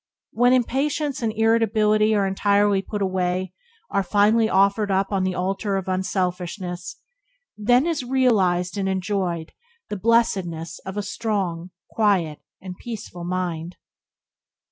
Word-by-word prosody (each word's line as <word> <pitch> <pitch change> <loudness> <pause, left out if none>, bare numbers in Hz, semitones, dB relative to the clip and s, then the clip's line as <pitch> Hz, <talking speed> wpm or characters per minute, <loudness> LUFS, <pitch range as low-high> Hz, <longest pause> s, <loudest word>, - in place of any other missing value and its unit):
When 245 +2 +3
impatience 275 +3 0
and 225 -2 0
irritability 215 -1 +3
are 200 -1 +2
entirely 200 +1 +2
put 205 0 -4
away, 185 0 -1 0.4
are 200 - +2
finally 215 +3 +3
offered 200 +1 +3
up 195 +1 +1
on 195 -2 +1
the 185 -1 -1
altar 195 +2 -1
of 190 - -4
unselfishness, 180 -1 -3 0.6
then 245 +6 +3
is 325 -5 -1
realized 205 -8 +1
and 190 -1 0
enjoyed 185 -3 -2 0.4
the 205 - -3
blessedness 190 -7 +1
of 190 +2 -5
a 205 - -1
strong, 195 -5 -2 0.2
quiet, 190 -9 +1 0.2
and 185 -1 -8
peaceful 210 -7 -7
mind. 175 -2 -3
195 Hz, 125 wpm, -23 LUFS, 185-220 Hz, 0.6 s, When